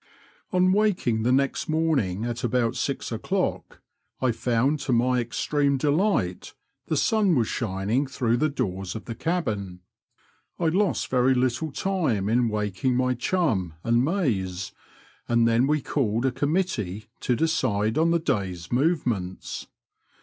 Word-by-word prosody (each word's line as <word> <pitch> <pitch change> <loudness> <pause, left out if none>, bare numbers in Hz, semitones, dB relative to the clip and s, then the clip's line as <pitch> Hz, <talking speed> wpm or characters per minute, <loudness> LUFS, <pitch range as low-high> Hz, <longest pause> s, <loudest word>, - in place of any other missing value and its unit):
On 185 0 +3
waking 185 - +1
the 120 +3 +2
next 140 +3 +1
morning 145 - +1
at 120 +1 -4
about 120 -1 +1
six - - -2
o'clock, - - -2 0.4
I 130 -2 +2
found, 125 +5 +1
to 135 - -3
my 125 +1 +3
extreme 140 +4 0
delight, 145 - 0 0.3
the - - 0
sun 210 -6 +3
was 115 -4 +2
shining 110 +4 -1
through 120 -3 0
the 155 +5 +2
doors 95 -8 -3
of 110 - -7
the 115 - -5
cabin. 110 - -2 0.8
I 170 -2 +1
lost 190 +3 +1
very 130 0 +3
little 130 +5 0
time 135 - 0
in 120 +1 +2
waking 105 +4 -1
my 125 0 +2
chum 120 - 0
and 120 +1 +2
Mayes, 105 - -1 0.6
and 120 -1 +4
then 115 +3 +3
we 150 -2 +1
called 120 -3 0
a 130 - +2
committee 135 - -1
to 125 - 0
decide 115 -9 +1
on 165 +1 +3
the 170 - +3
day's 100 - -2
movements. 120 - -1
125 Hz, 140 wpm, -25 LUFS, 110-155 Hz, 0.8 s, and